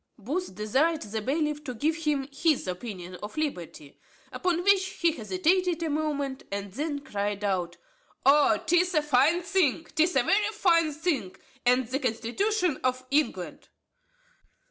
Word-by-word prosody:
Booth 275 - -4
desired 270 - +1
the 215 +1 -4
bailiff 300 +4 -1
to 255 -4 -5
give 305 +7 0
him 300 -4 -1
his 295 - +1
opinion 180 -2 -6
on 210 - -5
liberty. 175 - -5 0.3
Upon 355 -2 -1
which, 400 0 +4
he 340 -3 0
hesitated 350 - 0
a 320 - -1
moment, 285 -3 -2
and 200 0 -4
then 290 +5 -3
cried 205 -4 -3
out, 180 -4 -1 0.5
"O 285 +1 +5
'tis 355 +2 +2
a 305 - +3
fine 300 +5 +3
thing, 345 -5 +1
'tis 320 +1 +2
a 270 - +4
very 415 - +2
fine 335 -6 +3
thing, 290 - -2 0.3
and 250 0 +3
the 260 +3 -2
constitution 295 - 0
of 255 0 0
England." 295 +1 -1
295 Hz, 145 wpm, -27 LUFS, 230-335 Hz, 0.5 s, O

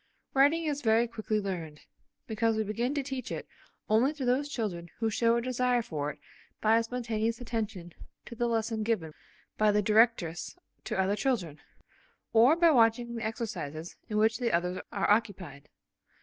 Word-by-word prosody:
Writing 290 +5 +4
is 290 -2 -1
very 230 -1 +3
quickly 220 -2 -2
learned, 170 -7 -5 0.4
because 225 0 0
we 220 - 0
begin 235 +6 -2
to 285 - 0
teach 265 -1 -5
it - - -5 0.4
only 230 +6 +3
to 295 -4 -5
those 265 +4 +1
children 185 -10 -4
who 225 -1 0
show 230 +2 +2
a 235 - +1
desire 250 -1 +1
for 150 -6 -3
it 150 - -8 0.4
by 225 +1 +4
spontaneous 230 -1 -2
attention 215 -8 -4 0.3
to - - -9
the 240 +1 -1
lesson 225 -1 -1
given 210 -8 -1 0.5
by 215 -1 +5
the 210 0 +2
directress 215 - +2 0.3
to - - -2
other 190 +2 +2
children, 200 - -1 0.7
or 240 +7 +6
by 340 -1 +5
watching 235 -2 +3
the 230 -1 -4
exercises 175 -8 -5
in 210 - -1
which 220 +2 +3
the 240 -2 0
others 180 +2 0
are - - 0
occupied. 200 -9 -1
225 Hz, 165 wpm, -29 LUFS, 205-240 Hz, 0.7 s, or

